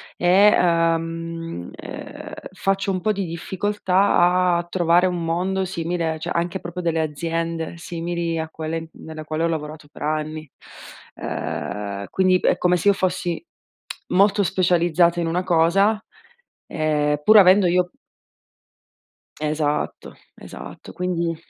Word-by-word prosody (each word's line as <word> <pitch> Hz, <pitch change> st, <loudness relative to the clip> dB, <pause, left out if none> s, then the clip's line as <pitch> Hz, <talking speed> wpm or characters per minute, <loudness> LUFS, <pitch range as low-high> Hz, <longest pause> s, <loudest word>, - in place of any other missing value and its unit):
e, -, -, -4 dB, 0.3 s
ehm, 165 Hz, -, 0 dB
uhm, -, -, -8 dB, 0.2 s
faccio 195 Hz, 0 st, 0 dB
un 185 Hz, -1 st, -2 dB
po' 215 Hz, -, +1 dB
di 200 Hz, -2 st, -2 dB
difficoltà 180 Hz, 0 st, +2 dB
a -, -, -3 dB
trovare 175 Hz, 0 st, +3 dB
un 175 Hz, -2 st, -2 dB
mondo 185 Hz, +3 st, 0 dB
simile 170 Hz, -2 st, -2 dB
cioè -, -, -5 dB
anche 175 Hz, +2 st, -2 dB
proprio 175 Hz, +1 st, -6 dB
delle 165 Hz, -2 st, 0 dB
aziende 165 Hz, +1 st, -3 dB
simili 170 Hz, 0 st, -3 dB
a 160 Hz, -, -3 dB
quelle 160 Hz, +1 st, -5 dB
nella 155 Hz, -1 st, -9 dB
quale 155 Hz, +1 st, -2 dB
ho -, -, +3 dB
lavorato 150 Hz, -2 st, -5 dB
per -, -, -9 dB
anni. 155 Hz, 0 st, -3 dB, 0.7 s
Uhm, 100 Hz, -1 st, -4 dB
quindi 185 Hz, -1 st, +3 dB
è -, -, +2 dB
come 180 Hz, 0 st, +2 dB
se 190 Hz, -, -2 dB
io 200 Hz, -, +7 dB
fossi 185 Hz, -, -2 dB, 0.7 s
molto 200 Hz, +2 st, +4 dB
specializzata 175 Hz, -2 st, +2 dB
in 165 Hz, -, -1 dB
una 175 Hz, +3 st, 0 dB
cosa, 190 Hz, +5 st, +3 dB, 0.7 s
ehm, 150 Hz, -2 st, 0 dB
pur 215 Hz, +7 st, +7 dB
avendo 190 Hz, 0 st, +7 dB
io 180 Hz, 0 st, +1 dB, 1.5 s
Esatto, 150 Hz, -1 st, -2 dB, 0.2 s
esatto, -, -, -10 dB
quindi 170 Hz, -2 st, -1 dB
170 Hz, 130 wpm, -22 LUFS, 160-180 Hz, 1.5 s, io